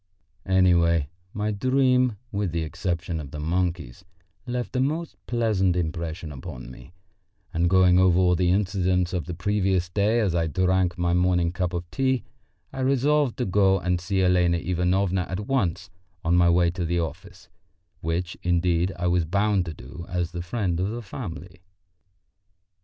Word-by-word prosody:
Anyway, 85 -5 +3 0.2
my 105 +1 -2
dream, 125 +1 +2
with 100 -3 -1
the 85 0 -1
exception 85 +1 -3
of 70 -3 -7
the 75 +1 -7
monkeys, 85 -2 -2 0.4
left 125 +1 -3
a - - +2
most 155 +5 -1
pleasant 110 -7 +1
impression 85 -1 -3
upon 65 -2 -8
me, 75 - -13 0.6
and 85 0 +2
going 90 -1 +5
over 90 -2 +4
all 90 -1 +4
the 90 0 +1
incidents 90 -2 +1
of 90 -3 -2
the 90 - -5
previous 95 -1 0
day 105 +5 +2
as 100 -6 +1
I 85 -1 +1
drank 90 +1 +1
my 85 0 +1
morning 90 -1 +2
cup 90 -1 -2
of 85 -1 -3
tea, 130 +4 0 0.5
I - - -6
resolved 140 +1 +2
to 125 - -1
go 95 0 +3
and 90 -1 -1
see 95 +1 0
Elena 90 -1 +3
Ivanovna 90 +1 0
at 95 +2 -3
once 95 -6 -1 0.3
on 85 +1 +3
my 90 -1 +5
way 85 0 +3
to 90 0 -4
the 85 +1 0
office 80 0 -6 0.5
which, 85 +2 -2
indeed, 90 0 +1
I 90 - -3
was 90 -1 +2
bound 100 +2 +1
to 80 - -4
do 70 +8 -10
as 90 -2 -2
the 85 0 -5
friend 90 -2 -2
of 95 +2 0
the 120 +2 -5
family. 95 -4 -8
90 Hz, 165 wpm, -25 LUFS, 85-100 Hz, 0.6 s, going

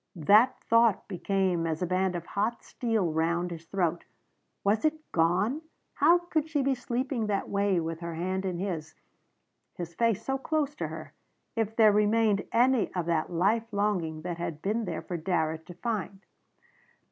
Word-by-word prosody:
That 205 - +4
thought 230 -3 +3
became 185 -3 0
as 160 +2 -2
a - - +2
band 185 +1 0
of 170 -1 -4
hot 215 +6 -2
steel 220 -8 -1
round 170 +2 0
his 165 -1 -8
throat. 175 -3 -1 0.6
Was 205 +2 +2
it 310 0 +3 0.2
gone? 180 - +2 0.3
How 325 +4 +5
could 330 -3 -2
she 295 -4 +1
be 270 0 +2
sleeping 245 -1 -2
that 200 -2 -1
way 200 -2 +2
with 165 0 -4
her 170 -1 -5
hand 185 +3 -2
in 185 -2 -2
his 170 -4 -4 0.8
his 170 -1 -6
face 230 +2 +1
so 270 0 -1
close 295 0 -1
to - - -2
her - - -8 0.4
if 225 -1 -1
there 220 -2 +6
remained 210 0 +2
any 250 0 +3
of 175 -2 -1
that 165 0 0
life 215 +7 +1
longing 185 -7 -1
that 175 -1 -4
had 165 -3 -4
been 220 +3 0
there 165 -3 -4
for 175 +1 -4
Darrett 160 -2 -1
to 175 - -10
find? 205 -1 -4
195 Hz, 170 wpm, -28 LUFS, 170-230 Hz, 0.8 s, there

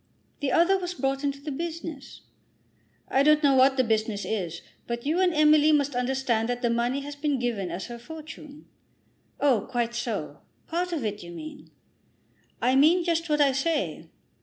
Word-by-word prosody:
"The 285 -2 -1
other 360 +7 +4
was 360 -1 -4
brought 270 -1 -1
into 280 -1 -1
the 295 +1 -5
business." 320 -2 -6 0.9
"I 270 - +2
don't 300 +1 +4
know 280 -1 +5
what 265 +1 +5
the 260 - +4
business 220 -2 -1
is. 175 -6 -3 0.2
But 235 +1 -4
you 315 +5 +1
and 365 -1 +3
Emily 305 -1 +5
must 290 -2 +2
understand 250 -2 0
that 245 +1 -3
the 235 - +2
money 240 +4 0
has 290 +1 -7
been 290 -1 -1
given 230 -7 -2
as 175 +2 -5
her 240 -1 -8
fortune." 310 +1 -11 0.7
"Oh, 260 -8 +2
quite 240 -2 -1
so; 240 -1 -4 0.3
part 355 +2 -2
of 305 -9 -2
it, 210 0 -3
you 175 - -9
mean." 295 - -9 0.9
"I 255 +1 +3
mean 320 +6 +5
just 335 -1 -1
what 300 0 +2
I 280 -1 +5
say." 290 +3 -2
275 Hz, 180 wpm, -26 LUFS, 240-310 Hz, 0.9 s, know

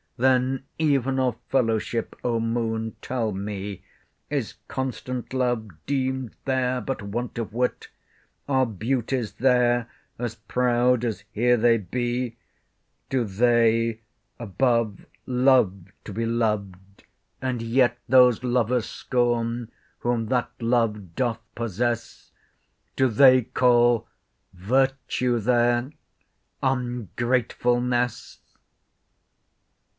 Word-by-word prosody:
Then, 130 +1 +2 0.2
even 135 -4 +2
of 125 -3 +1
fellowship, 115 -2 0
O 120 -2 +1
Moon, 115 -1 -2
tell 115 -4 -2
me, 100 0 -5 0.5
Is - - -2
constant 130 -1 -4
love 120 -4 0 0.2
deem'd 130 -3 -1
there 130 -1 0
but 135 -1 -4
want 115 +4 -4
of 110 -2 -4
wit? 125 +2 -1 0.6
Are 130 -2 +2
beauties 115 +2 -2
there 120 -2 +2 0.3
as 120 -2 -3
proud 125 0 +1
as 110 -4 -3
here 120 +3 +3
they 115 0 +4
be? 120 +4 -3 0.7
Do 130 -2 +1
they 115 +1 +2 0.4
above 115 0 0 0.2
love 125 -8 +3 0.2
to 105 - -7
be 115 +3 -2
loved, 100 -4 -2 0.4
and 130 -3 -2
yet 120 +1 +2
Those 125 -2 +5
lovers 125 -1 +1
scorn, 120 -2 -1 0.3
whom 120 -2 -1
that 125 0 0
love 115 -7 0
doth 120 -3 0 0.2
possess? 115 +1 -3 0.6
Do 130 - +3
they 130 +2 +6
call 120 -1 +3 0.5
virtue 125 +4 0
there—ungratefulness! 120 - -1
120 Hz, 95 wpm, -25 LUFS, 115-125 Hz, 0.7 s, they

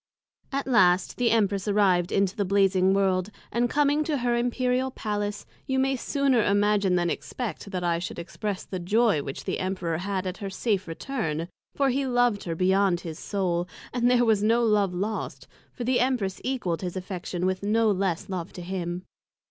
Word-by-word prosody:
At 275 0 -1
last 185 -8 +3
the 245 -1 +2
Empress 205 -3 +1
arrived 190 -4 +3
into 195 -1 +1
the 205 - 0
Blazing 190 -1 +3
world, 190 -1 +1 0.2
and 240 +1 +1
coming 295 +2 +2
to 300 -2 0
her 240 -1 +1
Imperial 250 +2 0
Palace, 205 -4 -3 0.2
you 265 - 0
may 265 0 +2
sooner 270 -1 +1
imagine 205 -2 +2
than 175 -1 +1
expect 215 -5 -5
that 185 -2 -3
I 170 -1 +1
should 175 - -5
express 190 +3 -4
the 185 - -5
joy 205 -1 +2
which 135 -1 -6
the - - -2
Emperor 185 -4 -2
had 190 0 -2
at 185 0 -3
her 200 - -5
safe 195 -1 -1
return; 165 - -3 0.3
for 275 -1 +2
he 270 +1 0
loved 245 -4 +2
her 165 -2 -2
beyond 190 0 +2
his 165 -1 -7
Soul; 180 -3 -1 0.3
and 245 0 +2
there 245 -1 +4
was 220 -3 +3
no 230 +3 +3
love 210 -4 +3
lost, 210 +4 -3 0.2
for 245 - -6
the 250 +1 +2
Empress 240 -7 0
equal'd 240 -11 -2
his 180 0 -4
Affection 180 -1 -4
with 185 0 0
no 215 +2 +2
less 190 -3 -1
love 185 -2 -4
to 180 - -7
him. 175 -1 -4
200 Hz, 185 wpm, -26 LUFS, 185-240 Hz, 0.3 s, there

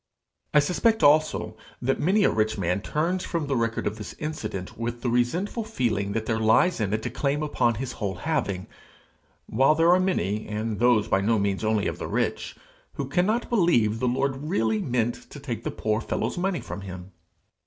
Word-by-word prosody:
I - - +3
suspect 180 +9 +2
also 155 +2 +3 0.2
that 135 +2 0
many 195 +6 +3
a - - +4
rich 110 0 0
man 90 +1 0
turns 170 - -1
from 165 -3 -2
the 140 -1 -1
record 115 -1 -1
of 105 +2 -2
this 105 - -7
incident 110 -12 -5
with 120 +1 -4
the 120 - 0
resentful 170 - 0
feeling 110 - -1
that 110 0 -2
there 110 -1 0
lies 110 +8 +3
in 100 -2 0
it 110 +1 -1
a - - -1
claim 145 +1 -1
upon 120 -6 +1
his 125 +3 -4
whole 100 -3 -3
having; 100 - -2 0.8
while 135 +6 +3
there 165 +2 +5
are 180 - +4
many, 110 - 0
and 105 0 -3
those 120 -3 +4
by 95 - +2
no 110 +3 +2
means 100 0 -1
only 110 -1 +1
of - - -3
the - - -4
rich, - - -2 0.4
who 140 - -4
cannot 200 - +1
believe 120 - +2
the 125 - 0
Lord 135 +2 0
really 110 -7 0
meant 120 0 -1
to 145 - -10
take 120 -5 -5
the - - -2
poor 110 +1 -1
fellow's - - -2
money 180 0 -1
from 100 - -7
him. 95 -1 -8
120 Hz, 195 wpm, -26 LUFS, 110-155 Hz, 0.8 s, there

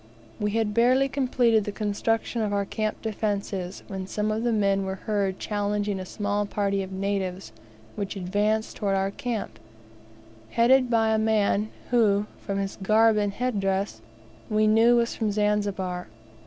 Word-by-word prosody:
We 210 - 0
had 220 -2 0
barely 255 +4 +4
completed 250 -5 +2
the 205 - -4
construction 220 +3 -1
of 210 -2 -1
our 200 -1 0
camp 215 +1 -3
defences 200 -4 -3
when 190 -2 -5
some 210 +2 -1
of 215 +1 -1
the 240 0 +1
men 200 -3 +2
were 190 0 -3
heard 195 -1 -1
challenging 205 -1 -1
a 185 - -6
small 205 +1 -1
party 200 -1 0
of 190 0 -6
natives 190 -1 -3 0.4
which 200 -1 -4
advanced 205 +4 0
towards 195 -2 0
our 195 0 0
camp, 230 0 -4 0.9
headed 250 - +4
by 225 -2 +3
a 220 - +2
man 215 -1 +2 0.2
who, 210 -4 +3
from 200 -1 -4
his 195 +1 -3
garb 220 +2 +4
and 205 -1 0
head 245 -1 -1
dress, 195 - -1 0.5
we 215 0 +3
knew 225 +3 +5
was 235 -1 +1
from 220 -2 -1
Zanzibar. 200 -3 -1
210 Hz, 160 wpm, -26 LUFS, 195-220 Hz, 0.9 s, knew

